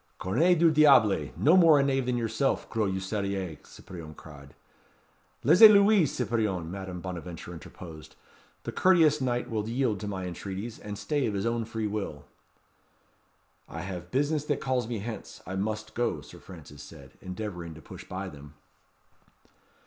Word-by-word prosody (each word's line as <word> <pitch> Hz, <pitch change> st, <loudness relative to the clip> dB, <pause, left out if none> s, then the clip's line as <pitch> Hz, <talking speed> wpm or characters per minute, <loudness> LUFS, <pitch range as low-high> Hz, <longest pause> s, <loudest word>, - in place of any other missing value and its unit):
"Cornes 160 Hz, -, +2 dB
du 165 Hz, 0 st, +5 dB
diable! 140 Hz, -9 st, +5 dB
no 160 Hz, +5 st, +5 dB
more 165 Hz, -5 st, +7 dB
a -, -, +3 dB
knave 135 Hz, -2 st, 0 dB
than 125 Hz, -1 st, 0 dB
yourself, 120 Hz, +4 st, -1 dB
gros 110 Hz, -4 st, 0 dB
usurier!" 95 Hz, -3 st, -3 dB
Cyprien 80 Hz, -4 st, -11 dB
cried. 70 Hz, -3 st, -13 dB, 0.9 s
"Laissez 180 Hz, +9 st, +9 dB
lui, 200 Hz, -4 st, +5 dB
Cyprien," 110 Hz, -, -2 dB
Madame 95 Hz, -2 st, -6 dB
Bonaventure 90 Hz, -1 st, -7 dB
interposed; 80 Hz, -1 st, -11 dB, 0.5 s
"the -, -, -4 dB
courteous 160 Hz, -5 st, +4 dB
knight 125 Hz, -1 st, -1 dB
will 110 Hz, -1 st, -3 dB
yield 120 Hz, -4 st, 0 dB
to 105 Hz, -, -5 dB
my 95 Hz, -2 st, -4 dB
entreaties, 95 Hz, +5 st, -6 dB
and 105 Hz, -1 st, -7 dB
stay 145 Hz, +6 st, -1 dB
of 105 Hz, -, -2 dB
his 100 Hz, +2 st, -2 dB
own 115 Hz, -1 st, -1 dB
free 110 Hz, -1 st, -4 dB
will." 100 Hz, -9 st, -4 dB, 1.4 s
"I 85 Hz, -, -6 dB
have 90 Hz, -1 st, -7 dB
business 145 Hz, -, 0 dB
that -, -, -1 dB
calls 130 Hz, -5 st, -1 dB
me 120 Hz, -1 st, -3 dB
hence. 110 Hz, 0 st, -7 dB
I 95 Hz, -, -5 dB
must 110 Hz, +2 st, -3 dB
go," 120 Hz, +1 st, -1 dB
Sir -, -, -13 dB
Francis 75 Hz, -6 st, -12 dB
said, 70 Hz, -2 st, -13 dB
endeavouring 90 Hz, -4 st, -6 dB
to 80 Hz, -, -12 dB
push -, -, -10 dB
by 95 Hz, +1 st, -6 dB
them. 75 Hz, -3 st, -12 dB
105 Hz, 155 wpm, -28 LUFS, 90-130 Hz, 1.4 s, Laissez